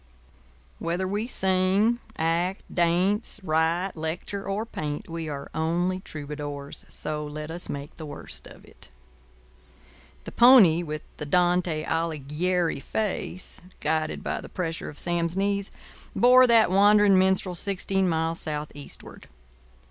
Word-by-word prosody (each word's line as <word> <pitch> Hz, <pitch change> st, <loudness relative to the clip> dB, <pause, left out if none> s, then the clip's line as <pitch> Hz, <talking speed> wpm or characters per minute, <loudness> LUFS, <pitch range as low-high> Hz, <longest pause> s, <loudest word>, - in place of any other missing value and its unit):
Whether 175 Hz, +3 st, -1 dB
we 205 Hz, +4 st, -2 dB
sing, 190 Hz, +2 st, +2 dB, 0.2 s
act, 170 Hz, +4 st, 0 dB
dance, 185 Hz, +6 st, +1 dB
write, 165 Hz, +3 st, +1 dB
lecture, 165 Hz, +5 st, -4 dB
or 205 Hz, +3 st, -1 dB
paint, 150 Hz, -9 st, -5 dB
we 165 Hz, -1 st, -5 dB
are 140 Hz, -1 st, -6 dB
only 175 Hz, +3 st, 0 dB
troubadours; 145 Hz, -3 st, -7 dB
so 150 Hz, 0 st, -4 dB
let 150 Hz, +1 st, -6 dB
us 175 Hz, +2 st, -5 dB
make 140 Hz, +1 st, -6 dB
the 160 Hz, -, -7 dB
worst -, -, -9 dB
of -, -, -14 dB
it. -, -, -15 dB, 1.3 s
The -, -, -8 dB
pony 230 Hz, -10 st, +7 dB
with 155 Hz, -3 st, -5 dB
the 150 Hz, -, -6 dB
Dante 175 Hz, -1 st, +2 dB
Alighieri 165 Hz, +1 st, -1 dB
face, 185 Hz, +3 st, -4 dB, 0.2 s
guided 155 Hz, 0 st, -1 dB
by -, -, -2 dB
the -, -, -10 dB
pressure 165 Hz, -3 st, -4 dB
of 150 Hz, -, -11 dB
Sam's 170 Hz, +1 st, +1 dB
knees, 200 Hz, 0 st, 0 dB, 0.5 s
bore 255 Hz, +1 st, +7 dB
that 225 Hz, -5 st, +5 dB
wandering 205 Hz, 0 st, +6 dB
minstrel 190 Hz, -1 st, +3 dB
sixteen 190 Hz, +1 st, 0 dB
miles 165 Hz, 0 st, -1 dB
southeastward. 150 Hz, -2 st, -7 dB
175 Hz, 125 wpm, -26 LUFS, 155-190 Hz, 1.3 s, pony